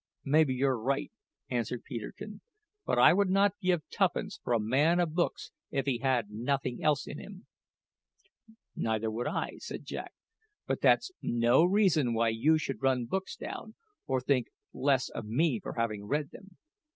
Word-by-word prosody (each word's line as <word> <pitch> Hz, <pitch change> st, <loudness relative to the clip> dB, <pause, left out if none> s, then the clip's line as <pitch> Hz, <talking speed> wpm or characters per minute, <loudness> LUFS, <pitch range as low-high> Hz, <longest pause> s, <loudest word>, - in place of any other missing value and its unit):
maybe 150 Hz, 0 st, +4 dB
you're 130 Hz, -1 st, +1 dB
right," 135 Hz, +4 st, -1 dB, 0.4 s
answered 120 Hz, 0 st, -2 dB
Peterkin; 140 Hz, -, -7 dB, 0.5 s
"but -, -, +1 dB
I -, -, +7 dB
would 200 Hz, +1 st, +2 dB
not 200 Hz, +1 st, +3 dB
give 180 Hz, -4 st, +1 dB
tuppence -, -, 0 dB
for 120 Hz, -, 0 dB
a 115 Hz, -, +3 dB
man 140 Hz, +11 st, +2 dB
of 170 Hz, -3 st, 0 dB
books 175 Hz, +1 st, -1 dB, 0.2 s
if 135 Hz, -, -1 dB
he 130 Hz, -4 st, 0 dB
had 125 Hz, -6 st, 0 dB
nothing 125 Hz, +3 st, -2 dB
else 150 Hz, -3 st, +2 dB
in 145 Hz, -, -7 dB
him." 195 Hz, -1 st, -11 dB, 1.3 s
"Neither 110 Hz, 0 st, -1 dB
would 120 Hz, +3 st, -3 dB
I," -, -, -3 dB
said -, -, -7 dB
Jack; -, -, -6 dB, 0.5 s
"but -, -, -2 dB
that's 375 Hz, -, +4 dB
no 120 Hz, +5 st, +3 dB
reason 175 Hz, -, +3 dB
why 115 Hz, 0 st, +2 dB
you 135 Hz, +9 st, +3 dB
should 140 Hz, -3 st, -4 dB
run 130 Hz, -2 st, +2 dB
books 190 Hz, +10 st, -3 dB
down, -, -, -7 dB, 0.3 s
or 130 Hz, -1 st, +1 dB
think 130 Hz, -1 st, +1 dB, 0.3 s
less 135 Hz, -2 st, +2 dB
of 110 Hz, -, -6 dB
me 130 Hz, +2 st, +1 dB
for -, -, -6 dB
having 110 Hz, -3 st, -2 dB
read 145 Hz, +6 st, -1 dB
them. 195 Hz, -2 st, -14 dB
135 Hz, 165 wpm, -30 LUFS, 120-160 Hz, 1.3 s, I